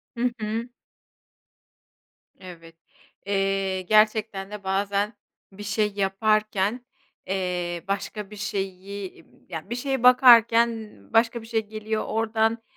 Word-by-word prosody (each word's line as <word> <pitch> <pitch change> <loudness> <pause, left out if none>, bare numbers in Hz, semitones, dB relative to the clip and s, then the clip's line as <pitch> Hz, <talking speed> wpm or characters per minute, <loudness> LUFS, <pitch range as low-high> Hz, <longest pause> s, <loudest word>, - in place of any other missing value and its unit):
Hı 245 +1 0
hı. 220 +3 -3 1.7
Evet. 165 -3 -12 0.5
Eee, 195 -1 0
gerçekten 215 0 +2
de 210 -1 -8
bazen 200 +2 0 0.4
bir 205 +2 -10
şey 210 0 0
yaparken, 215 +3 0 0.4
eee, 180 -2 -2
başka 200 +1 -3
bir - - -9
şeyi 200 -2 -3
iii, 190 -2 -9 0.2
ya, 160 +2 -7
bir 240 - -2
şeye 265 0 -2
bakarken 235 -3 +5 0.2
başka 230 +1 +3
bir 225 - -12
şey 225 -1 0
geliyor 215 0 -3
oradan. 225 +1 0
210 Hz, 115 wpm, -25 LUFS, 195-225 Hz, 1.7 s, bakarken